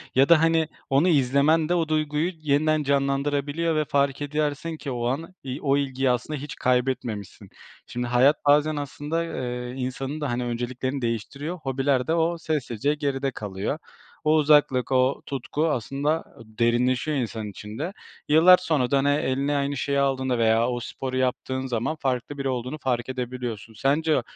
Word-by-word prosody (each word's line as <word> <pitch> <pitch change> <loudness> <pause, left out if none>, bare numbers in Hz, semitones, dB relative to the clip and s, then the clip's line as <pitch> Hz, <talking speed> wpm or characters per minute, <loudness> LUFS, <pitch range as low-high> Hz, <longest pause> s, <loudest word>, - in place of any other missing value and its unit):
ya 135 +3 +5
da, 170 -2 +7
hani, 165 -1 +3 0.2
onu 140 +6 +3
izlemen 150 +2 +3
de 175 - +3
o 165 -2 +1
duyguyu 155 +2 0
yeniden 155 +1 +2
canlandırabiliyor 140 +3 0
ve 155 -1 +1
fark 140 0 +1
edersin 150 +2 -2
ki 140 - -5
o 120 -1 -2
an 160 +8 -3
i 135 +1 -5
o 140 -1 +2
ilgiyi 135 -2 0
aslında 125 +5 -1
hiç 145 +1 -7
kaybetmemişsin. 125 -5 -1 0.4
Şimdi 120 0 -3
hayat 130 +5 +3
bazen 150 +1 +4
aslında, 145 +3 -3
eee, 125 -4 -4
insanın 135 +3 -4
da, 145 - -1
hani, 120 +1 -1
önceliklerini 125 +3 -3
değiştiriyor, 140 - -3
hobiler 135 -3 0
de 160 - +2
o 170 +1 +1
sessizce 145 -4 -1
geride 140 -2 -1
kalıyor. 105 +4 -4 0.5
O 155 0 +4
uzaklık, 145 -4 +3
o 130 +1 +2
tutku 140 +4 -2
aslında 140 +6 -1 0.2
derinleşiyor 120 +6 +1
insanın 110 -4 -3
içinde. 110 - -6 0.4
Yıllar 165 +4 +8
sonra 150 -9 0
da, 140 - +4
hani, 140 +1 +2
eline 145 0 +1
aynı 140 0 -1
şeyi 140 +2 0
aldığında 130 -2 +1
veya 115 0 +3
o 120 - -2
sporu 130 +2 -5
yaptığın 130 +1 -1
zaman 120 +5 -1
farklı 135 +1 -2
biri 135 -1 -2
olduğunu 125 +3 -3
fark 125 -3 -2
edebiliyorsun. 125 -3 -5
Sence 145 +5 +1
140 Hz, 160 wpm, -25 LUFS, 125-150 Hz, 0.5 s, Yıllar